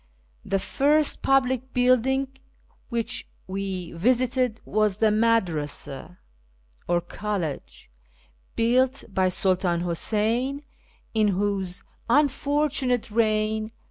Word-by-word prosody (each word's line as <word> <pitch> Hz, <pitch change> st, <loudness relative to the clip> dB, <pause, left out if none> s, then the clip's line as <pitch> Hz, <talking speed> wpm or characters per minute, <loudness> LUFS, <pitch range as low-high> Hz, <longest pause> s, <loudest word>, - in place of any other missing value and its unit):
The 195 Hz, -, 0 dB
first 295 Hz, +8 st, +2 dB
public 260 Hz, -1 st, +1 dB
building 255 Hz, +2 st, +3 dB, 0.6 s
which 235 Hz, 0 st, -2 dB, 0.2 s
we 190 Hz, -2 st, -4 dB
visited 250 Hz, +4 st, +1 dB
was 210 Hz, -2 st, +1 dB
the 220 Hz, 0 st, +3 dB
Madrasa, 180 Hz, -7 st, -1 dB, 0.7 s
or 175 Hz, 0 st, +2 dB
College, 180 Hz, -3 st, -5 dB, 0.7 s
built 255 Hz, +3 st, +2 dB
by 190 Hz, -1 st, +1 dB
Sultan 180 Hz, -2 st, +1 dB
Huseyn, 225 Hz, -, -1 dB, 0.5 s
in 215 Hz, -2 st, +3 dB
whose 195 Hz, -2 st, -1 dB, 0.3 s
unfortunate 280 Hz, -3 st, +1 dB
reign 215 Hz, -1 st, +1 dB
(A. -, -, -16 dB
220 Hz, 90 wpm, -25 LUFS, 190-255 Hz, 0.7 s, building